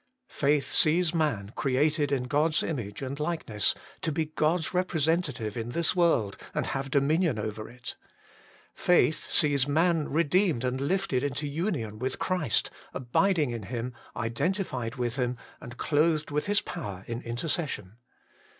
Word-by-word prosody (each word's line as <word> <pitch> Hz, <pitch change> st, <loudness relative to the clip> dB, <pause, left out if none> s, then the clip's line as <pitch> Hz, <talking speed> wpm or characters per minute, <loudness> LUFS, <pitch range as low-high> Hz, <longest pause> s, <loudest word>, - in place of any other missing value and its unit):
Faith 145 Hz, 0 st, +2 dB
sees 170 Hz, +2 st, +3 dB
man 120 Hz, -, 0 dB
created 145 Hz, +2 st, +1 dB
in 135 Hz, -3 st, +1 dB
God 150 Hz, +5 st, +1 dB
s 150 Hz, -, +2 dB
image 120 Hz, -7 st, -4 dB
and 135 Hz, +2 st, -4 dB
likeness 150 Hz, -, +1 dB, 0.3 s
to 160 Hz, -, 0 dB
be 160 Hz, +1 st, 0 dB
God 155 Hz, +3 st, +1 dB
s 160 Hz, -, -4 dB
representative 160 Hz, -, 0 dB
in 120 Hz, 0 st, -4 dB
this 170 Hz, +1 st, +2 dB
world 160 Hz, -, +2 dB, 0.2 s
and -, -, 0 dB
have 135 Hz, 0 st, -3 dB
dominion 150 Hz, +1 st, +2 dB
over 110 Hz, 0 st, -4 dB
it. 125 Hz, +1 st, -8 dB, 0.8 s
Faith 170 Hz, -2 st, +2 dB
sees 145 Hz, -3 st, +3 dB
man 160 Hz, +1 st, +2 dB
redeemed 165 Hz, -, +2 dB
and 130 Hz, +1 st, -1 dB
lifted 145 Hz, -4 st, 0 dB
into 145 Hz, +1 st, -2 dB
union 145 Hz, -, -2 dB
with 130 Hz, +1 st, -2 dB
Christ, 170 Hz, -10 st, 0 dB, 0.2 s
abiding 150 Hz, +3 st, +2 dB
in 115 Hz, -1 st, -4 dB
Him, 115 Hz, +5 st, -4 dB, 0.2 s
identified 125 Hz, -, -1 dB
with 120 Hz, 0 st, -2 dB
Him, 125 Hz, -1 st, 0 dB, 0.2 s
and 120 Hz, +1 st, -9 dB
clothed 155 Hz, 0 st, +1 dB
with 150 Hz, +4 st, -1 dB
His 205 Hz, 0 st, +3 dB
power 100 Hz, -, -6 dB
in 120 Hz, +1 st, -4 dB
intercession. 120 Hz, -, -3 dB
145 Hz, 150 wpm, -28 LUFS, 120-165 Hz, 0.8 s, sees